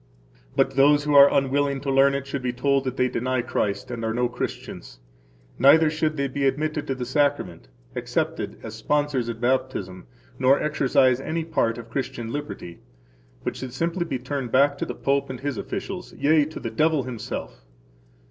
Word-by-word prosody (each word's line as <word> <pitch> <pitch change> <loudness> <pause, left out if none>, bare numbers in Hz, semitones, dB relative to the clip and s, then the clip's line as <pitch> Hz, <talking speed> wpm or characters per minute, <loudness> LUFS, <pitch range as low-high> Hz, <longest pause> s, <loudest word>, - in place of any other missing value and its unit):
But 135 0 +3
those 145 +2 +4
who 150 0 0
are 140 0 +8
unwilling 140 0 +1
to 140 - -2
learn 135 +1 +4
it 140 0 -3
should 140 -1 -4
be 125 -1 -1
told 135 +2 +1
that 130 0 -3
they 125 - +3
deny 130 0 -1
Christ 105 -2 -2
and 115 -2 -5
are 110 0 -1
no 125 0 +2
Christians, - - -6 0.6
neither 155 +4 +6
should 155 0 -1
they 140 0 0
be 135 +1 0
admitted 150 +2 -1
to 135 - -1
the 125 -1 -4
Sacrament, 130 - 0 0.3
accepted - - -2
as 110 - -7
sponsors 135 +1 0
at 115 -1 -5
baptism, 120 - -1 0.3
nor 130 +2 +4
exercise 130 -4 +2
any 160 +3 -2
part 115 -8 0
of 115 -1 -10
Christian 130 -3 -4
liberty, 145 - -6 0.6
but - - -3
should 130 -2 -7
simply 170 +5 -1
be 140 -6 -2
turned 130 -1 -4
back 140 +2 +4
to - - -2
the - - -5
Pope 140 0 0
and 130 -1 -6
his 140 -4 -3
officials, - - -5
yea, 150 0 +3
to 155 - -7
the 115 - -5
devil 155 +4 +2
himself. 120 -3 -6
135 Hz, 185 wpm, -24 LUFS, 125-145 Hz, 0.6 s, are